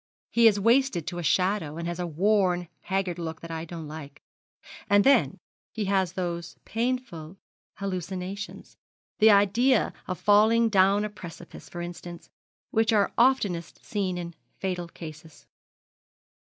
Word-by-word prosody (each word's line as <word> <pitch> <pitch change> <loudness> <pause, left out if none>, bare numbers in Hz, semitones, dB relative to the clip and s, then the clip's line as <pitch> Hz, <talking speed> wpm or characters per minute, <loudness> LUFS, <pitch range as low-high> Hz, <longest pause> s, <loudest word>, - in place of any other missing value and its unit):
He 235 -1 +6
is 205 -2 +4
wasted 230 - +2
to 175 -1 -4
a - - -4
shadow, 180 -2 +1
and 170 0 -4
has 175 0 -4
a 175 - -2
worn, 180 +1 +1
haggard 190 -2 -2
look 160 -1 -5
that 165 - -8
I 160 0 -4
don't 165 -2 -7
like. 150 -2 -10 0.7
And 205 0 +5
then 275 +1 +4 0.4
he 215 -2 -2
has 190 -3 +1
those 170 -2 -4
painful 225 -8 -3 0.4
hallucinations 190 +1 -5 0.4
that 220 0 +7
idea 215 +5 +4
of 185 - -3
falling 220 +3 +4
down 200 +1 +4
a - - -3
precipice, 175 -3 -11
for 175 - -6
instance, 175 0 -8 0.4
which 225 0 +2
are 205 -2 +2
oftenest 215 -9 +1
seen 190 -4 -2
in 170 -1 -6 0.2
fatal 180 -2 -3
cases.' 155 -2 -11
185 Hz, 140 wpm, -27 LUFS, 170-210 Hz, 0.7 s, that